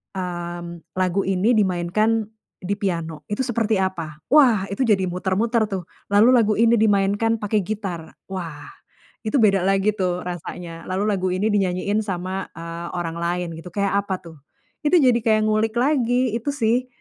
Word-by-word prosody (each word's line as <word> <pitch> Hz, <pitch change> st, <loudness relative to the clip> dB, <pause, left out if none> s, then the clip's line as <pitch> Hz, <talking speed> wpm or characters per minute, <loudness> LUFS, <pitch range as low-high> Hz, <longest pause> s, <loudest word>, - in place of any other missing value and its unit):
mmm, 175 Hz, -2 st, -6 dB
lagu 185 Hz, +1 st, +1 dB
ini 195 Hz, +4 st, +2 dB
dimainkan 205 Hz, +4 st, +1 dB, 0.4 s
di 200 Hz, +3 st, -1 dB
piano 165 Hz, -6 st, -3 dB
itu 210 Hz, +5 st, -1 dB
seperti 230 Hz, -3 st, 0 dB
apa. 165 Hz, -5 st, -4 dB
Wah, 250 Hz, -10 st, +6 dB
itu 255 Hz, +5 st, 0 dB
jadi 195 Hz, -4 st, +3 dB
muter-muter 210 Hz, +5 st, 0 dB
tuh, 190 Hz, -3 st, -4 dB, 0.2 s
lalu 205 Hz, +4 st, +5 dB
lagu 225 Hz, -4 st, +4 dB
ini 230 Hz, +1 st, +4 dB
dimainkan 205 Hz, +1 st, +2 dB
pakai 210 Hz, +1 st, +1 dB
gitar. 195 Hz, -6 st, -5 dB, 0.2 s
Wah, 165 Hz, -6 st, -6 dB, 0.5 s
itu 245 Hz, +5 st, +1 dB
beda 195 Hz, -4 st, +4 dB
lagi 195 Hz, +2 st, +2 dB
tuh 180 Hz, -2 st, -1 dB
rasanya, 175 Hz, -1 st, -7 dB
lalu 190 Hz, +2 st, -2 dB
lagu 185 Hz, -2 st, 0 dB
ini 190 Hz, +4 st, +1 dB
dinyanyiin 200 Hz, +1 st, 0 dB
sama, 185 Hz, -1 st, -3 dB
eee, 170 Hz, +1 st, -7 dB
orang 170 Hz, -2 st, -3 dB
lain 175 Hz, +1 st, -2 dB
gitu, 165 Hz, +1 st, -10 dB
kayak 200 Hz, 0 st, 0 dB
apa 190 Hz, -2 st, -3 dB
tuh. 165 Hz, -3 st, -13 dB, 0.5 s
Itu 335 Hz, +3 st, +5 dB
jadi 250 Hz, -3 st, +4 dB
kayak 215 Hz, -1 st, +3 dB
ngulik 215 Hz, +1 st, +1 dB
lagi, 250 Hz, -3 st, +2 dB
itu 280 Hz, +5 st, -2 dB
sih, 245 Hz, -1 st, +1 dB
195 Hz, 160 wpm, -22 LUFS, 175-220 Hz, 0.5 s, Wah